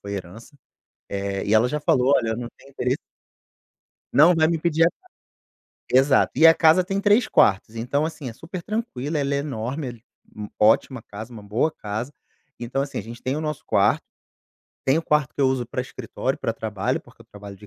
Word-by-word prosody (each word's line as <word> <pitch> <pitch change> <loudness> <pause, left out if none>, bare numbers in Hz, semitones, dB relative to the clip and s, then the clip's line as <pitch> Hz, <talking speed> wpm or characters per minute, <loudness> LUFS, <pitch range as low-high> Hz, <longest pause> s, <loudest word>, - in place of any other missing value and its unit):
foi 100 0 -7
herança, 100 - -9 0.5
eh, 100 0 -3
e 100 - 0
ela 110 +2 +5
já 150 +3 -2
falou: 135 -1 +3
“Olha, 115 - -1
eu 110 - -2
não 120 - -5
tenho 135 - -18
interesse.” 130 -1 -1 1.1
não 165 +5 +6
vai 160 -1 +3
me 165 0 0
pedir 165 0 +1
a 165 - +5
casa. 370 - -28 0.8
Exato. 130 +2 +4
E 160 +5 +5
a 165 - +10
casa 165 +3 +5
tem 195 +2 -2
3 205 +3 +3
quartos, 100 +3 +2
então, 130 +7 -1
assim, 160 -4 -6
é - - -9
supertranquila, 165 - -4
ela 140 0 0
é - - +1
enorme, 135 0 -4 0.5
é 105 -1 -7
ótima 115 +4 +3
casa, 110 +4 -9
uma 110 -3 -10
boa 110 +10 0
casa. 110 +5 -5 0.5
Então, 120 +3 -2
assim, 140 0 -4
a - - -2
gente 115 +2 -10
tem 130 +2 -2
o - - -3
nosso 150 -2 -4
quarto, - - +2 0.8
tem 135 +2 +3
o - - -2
quarto 150 -3 +1
que - - -5
eu 135 - +4
uso 130 -2 -1
pra 125 +1 -3
escritório, 130 +2 -4
pra 115 - -1
trabalho, 105 -3 -2
porque - - -22
eu - - -26
trabalho 100 -1 -11
de 105 - -15
130 Hz, 205 wpm, -23 LUFS, 110-155 Hz, 1.1 s, a